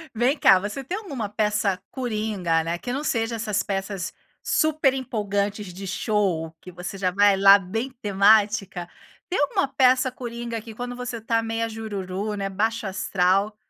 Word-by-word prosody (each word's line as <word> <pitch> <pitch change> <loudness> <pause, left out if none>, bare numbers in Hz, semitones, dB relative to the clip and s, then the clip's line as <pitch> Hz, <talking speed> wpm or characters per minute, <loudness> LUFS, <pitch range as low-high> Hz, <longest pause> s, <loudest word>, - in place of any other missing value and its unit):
Vem 255 +6 +2
cá, 190 -1 +6
você 210 +8 -5
tem 365 +10 -3
alguma 275 - -5
peça 210 -2 0
coringa, 210 -9 -1
né, 170 +1 -2
que 245 - -5
não 285 +3 -2
seja 230 -4 0
essas 210 -3 -1
peças 195 -1 -3 0.3
super 310 -4 +2
empolgantes 205 -5 -2
de 195 +2 -8
show, 180 -6 -1
que 180 - -10
você 180 +3 -7
já 185 -1 0
vai 200 +1 +4
lá 200 +1 +8
bem 225 +8 -4
temática. 200 -3 +3 0.4
Tem 365 - 0
alguma 285 -1 +1
peça 260 -1 +3
coringa, 235 -2 -5
que 220 -1 -11
quando 245 +1 -5
você 245 -1 -5
está 225 0 0
meia 225 0 -2
jururu, 205 -2 -4
né, 195 -1 -3
baixo-astral, 195 -1 0
210 Hz, 160 wpm, -24 LUFS, 195-235 Hz, 0.4 s, lá